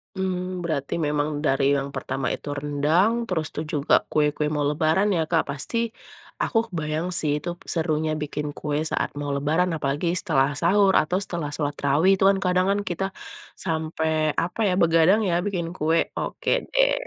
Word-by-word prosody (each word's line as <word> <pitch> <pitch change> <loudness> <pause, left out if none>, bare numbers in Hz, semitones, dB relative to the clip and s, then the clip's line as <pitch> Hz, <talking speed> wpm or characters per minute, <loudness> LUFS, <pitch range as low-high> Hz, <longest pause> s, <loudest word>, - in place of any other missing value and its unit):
Mmm, 185 -1 -3
berarti 145 -5 -2
memang 150 0 0 0.2
dari 135 +1 +3
yang 140 0 -2
pertama 130 0 -3
itu 145 - -6
rendang, 150 +8 +2 0.2
terus 160 -4 -1
tuh 155 - -3
juga 145 0 +1 0.2
kue-kue 150 0 +1
mau 145 - 0
Lebaran 160 +6 +2
ya, 165 - +1
Kak. 165 - +3
Pasti 150 - -4 0.6
aku 230 - 0
kebayang 155 0 -2
sih, 150 -2 0
itu 175 - -4 0.2
serunya 160 -2 0
bikin 150 0 -3
kue 150 -1 -2
saat - - 0
mau 145 - -3
Lebaran, 160 +6 +1
apalagi 145 +2 -1
setelah 135 +1 +2
sahur 195 +3 +4
atau 175 +4 -1
setelah 170 -6 -3
sholat 145 -2 -2
tarawih, 150 +7 +3
tuh 195 - +3
kan 195 - 0
kadang 180 0 +2
kan 200 - +1
kita 185 +3 -2 0.6
sampai, 160 -2 -1 0.3
apa 175 +6 -6
ya, - - +1
begadang 165 +5 +4
ya, 170 - +1
bikin 180 -5 -2
kue, 160 +2 +2 0.2
oke - - -2 0.2
deh. - - +4
160 Hz, 170 wpm, -24 LUFS, 145-180 Hz, 0.6 s, sahur